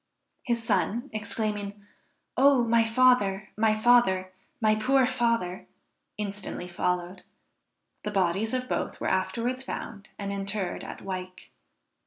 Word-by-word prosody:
His 235 -2 -1
son 225 +4 0
exclaiming, 210 -1 -3 0.5
"Oh 275 -2 +5
my 230 0 +4
father, 225 -4 +3
my 215 0 +2
father! 215 -6 +4 0.3
my 215 -2 +4
poor 260 +5 +3
father!" 230 -8 0 0.5
instantly 200 -3 -4
followed. 180 +1 -2 0.8
The 210 - -2
bodies 195 +4 +1
of 255 0 -2
both - - -2
were - - -4
afterwards 250 +2 -1
found 215 -5 -6
and 200 -1 -4
interred 195 -2 -2
at - - -8
Wyke. 185 -1 -6
215 Hz, 120 wpm, -27 LUFS, 195-235 Hz, 0.8 s, Oh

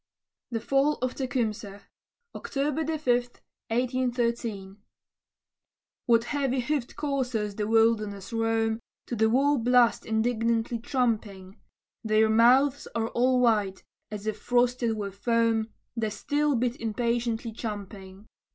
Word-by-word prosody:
THE 230 -2 -2
FALL 275 +5 +2
OF 255 - 0
TECUMSEH 220 -6 -3 0.5
[October 290 +3 -2
5, 305 - -17 0.6
1813] 235 -5 -1 1.3
What 230 -1 +4
heavy 270 0 -1
hoofed 265 -1 -2
coursers 250 -8 -2
the 210 +1 -3
wilderness 220 -2 +1
roam, 225 0 0 0.3
To 240 - -4
the 220 0 +3
war 275 +4 +3
blast 245 0 +3
indignantly 230 +1 0
tramping? 215 -7 -2 0.4
Their 220 0 +3
mouths 255 +5 +4
are 225 0 0
all 250 +1 +2
white, 210 -5 +1 0.3
as 210 -1 -7
if 215 -1 -3
frosted 245 -1 +1
with 200 -2 -4
foam, 230 +1 +1 0.2
The 225 -2 -1
steel 290 +6 0
bit 245 0 0
impatiently 235 0 -1
champing. 200 -3 -7
230 Hz, 115 wpm, -27 LUFS, 220-250 Hz, 1.3 s, What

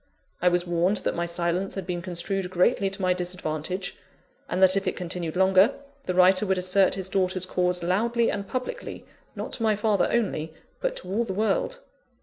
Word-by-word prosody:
I 180 - +3
was 175 0 +1
warned 175 +4 +1
that - - -1
my 170 0 -2
silence 170 +2 -1
had 195 -2 -4
been 175 -1 -3
construed 180 +1 -3
greatly 195 +3 +2
to 195 0 -7
my 185 0 +3
disadvantage; 180 0 -3 0.5
and 180 - -1
that 190 0 +7
if 195 0 -1
it 185 - 0
continued 175 -2 -4
longer, 190 +6 +4 0.3
the 180 - -2
writer 185 +2 +5
would 190 0 +1
assert 185 +1 +3
his 190 -1 -3
daughter's 185 -1 +1
cause 180 -1 0
loudly 230 +6 +1
and 200 -1 -4
publicly, 255 +3 -5 0.3
not - - -6
to - - -3
my 220 -2 +3
father 210 -2 +2
only, 165 -9 -1 0.2
but - - -1
to - - -9
all 205 +6 0
the 195 -5 -5
world. 220 - 0
185 Hz, 190 wpm, -26 LUFS, 180-200 Hz, 0.5 s, that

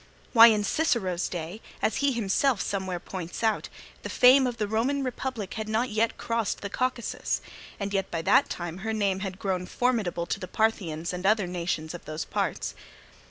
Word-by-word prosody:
Why, 230 -1 +10
in 215 -2 +3
Cicero's 205 - 0
days, 175 +4 -5 0.2
as 220 - 0
he 280 -1 +2
himself 235 +1 +1
somewhere 190 -3 -2
points 180 +2 -6
out, 220 -1 +1 0.3
the - - -6
fame 260 +1 +6
of 245 -1 -4
the 210 -2 -1
Roman 250 +7 0
Republic 255 -5 -4
had 220 -1 -4
not 225 +3 0
yet 220 +2 +1
crossed 230 -2 -1
the 200 - -5
Caucasus, 255 -1 -1 0.4
and 200 0 -3
yet 195 -1 0
by 165 -1 -3
that - - +4
time 175 0 -5
her 220 +2 -2
name 200 -3 +1
had 190 -1 -4
grown 185 -2 -2
formidable 220 -9 0
to 175 - -2
the 185 - -6
Parthians 180 -6 -1
and 180 0 -5
other 210 0 +3
nations 170 -3 -3
of 175 - -9
those 155 +1 -4
parts. - - -2
205 Hz, 185 wpm, -27 LUFS, 180-230 Hz, 0.4 s, Why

